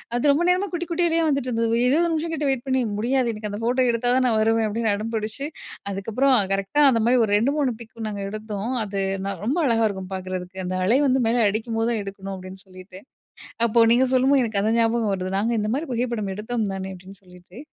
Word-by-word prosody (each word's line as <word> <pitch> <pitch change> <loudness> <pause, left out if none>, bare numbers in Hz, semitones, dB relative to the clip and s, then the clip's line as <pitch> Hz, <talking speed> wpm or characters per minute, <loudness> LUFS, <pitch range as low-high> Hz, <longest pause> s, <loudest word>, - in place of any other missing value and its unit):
"அது 280 +4 +3
ரொம்ப 320 +5 +1
நேரமா 370 +2 +1
குட்டி 345 0 -3
குட்டிலேயே 335 -1 +2
வந்துட்டு 275 -3 -1
இருந்தது 230 0 +1
20 335 +6 +3
நிமிஷம் 325 +1 -2
கிட்ட 295 -1 -1
வெயிட் 260 -1 -3
பண்ணி 260 -1 +2 0.2
முடியாது. 250 +1 +1
எனக்கு 210 -1 -5
அந்த 205 - -5
ஃபோட்டோ 255 +2 +2
எடுத்தா 240 +1 0
தான் 260 - +2
நான் 220 -1 +2
வருவேன்" 225 0 +2
அப்படின்னு 220 0 0
அடம் 225 +3 -5
பிடிச்சு, 220 +6 -3 0.5
அதுக்கப்புறம் 230 +7 +1 0.2
கரெக்ட்‌டா 195 +10 +1
அந்த 230 -2 +1
மாதிரி 245 +1 +4
ஒரு 205 - -4
2, 255 +7 +1
3 265 -5 +1
பிக்கும் 225 -1 -7
நாங்க 200 -1 -5
எடுத்தோம், 215 +1 -5
அது 200 -1 -4 0.3
நான் 195 -3 -4
ரொம்ப 280 +9 0
அழகா 225 -1 +2
இருக்கும் 190 -1 -7
பாக்கறதுக்கு. 185 0 -6
அந்த 185 +1 -3
அலை 235 +7 +4
வந்து 260 0 +2
மேல 235 +1 +2
அடிக்கும்போது 225 +2 -2
தான் 220 -3 -1
எடுக்கணும். 195 0 -9
அப்டீன்னு 185 +1 -10
சொல்லிட்டு, 185 0 -13 0.7
அப்போ 235 +1 +1
நீங்க 255 +2 +4
சொல்லும்போது 265 +1 +4
எனக்கு 215 -3 -1
அந்த 220 +2 +1
ஞாபகம் 225 -2 +1
வருது, 185 0 -4
"நாங்க 225 +4 0
இந்த 210 +1 -1
மாதிரி 300 +3 -3
புகைப்படம் 235 -5 -2
எடுத்தோம் 220 -1 -2
தானே 190 0 -5
அப்படின்னு 185 +1 -13
சொல்லிட்டு," 180 +2 -16
225 Hz, 215 wpm, -23 LUFS, 200-255 Hz, 0.7 s, மாதிரி